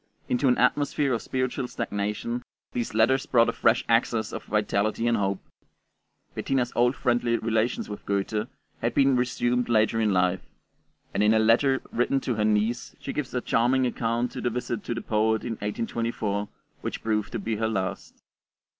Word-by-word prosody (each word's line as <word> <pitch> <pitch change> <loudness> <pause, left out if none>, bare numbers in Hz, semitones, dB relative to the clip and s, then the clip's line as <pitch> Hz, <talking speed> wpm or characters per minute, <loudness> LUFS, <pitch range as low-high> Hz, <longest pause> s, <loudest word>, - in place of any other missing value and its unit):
Into 130 +3 +1
an 125 - +4
atmosphere 140 +1 +2
of 115 - -1
spiritual 130 -1 -2
stagnation, 105 +2 -3 0.3
these 120 -3 -3
letters 130 +5 +3
brought 115 -2 +4
a - - -1
fresh 115 +2 +2
access 115 -2 +1
of - - -5
vitality 105 +1 0
and 120 0 +3
hope. 100 -2 0 0.9
Bettina's 130 -3 -1
old 120 +2 +3
friendly 120 -1 +1
relations 115 +1 0
with 105 - -7
Goethe 100 +2 -1 0.3
had 120 +1 -1
been 135 -1 +4
resumed 125 0 0
later 115 0 +3
in 110 -2 +2
life, 90 0 +2 0.7
and - - 0
in 105 +1 +4
a - - +5
letter 115 +5 +3
written 125 +3 +1
to 125 - -1
her 105 -1 0
niece 110 +3 0
she 135 - -5
gives 150 -3 -3
a 125 - 0
charming 125 +3 +2
account 120 0 -1
of - - -4
the 120 - +1
visit 120 -2 -3
to 120 - -2
the 115 - -3
poet 110 +1 +1
in 120 - -3
1824, 105 -1 -2 0.3
which - - -5
proved 105 -2 0
to - - -1
be 110 +1 -2
her 110 +1 0
last. 95 -4 -3
115 Hz, 175 wpm, -26 LUFS, 105-125 Hz, 0.9 s, a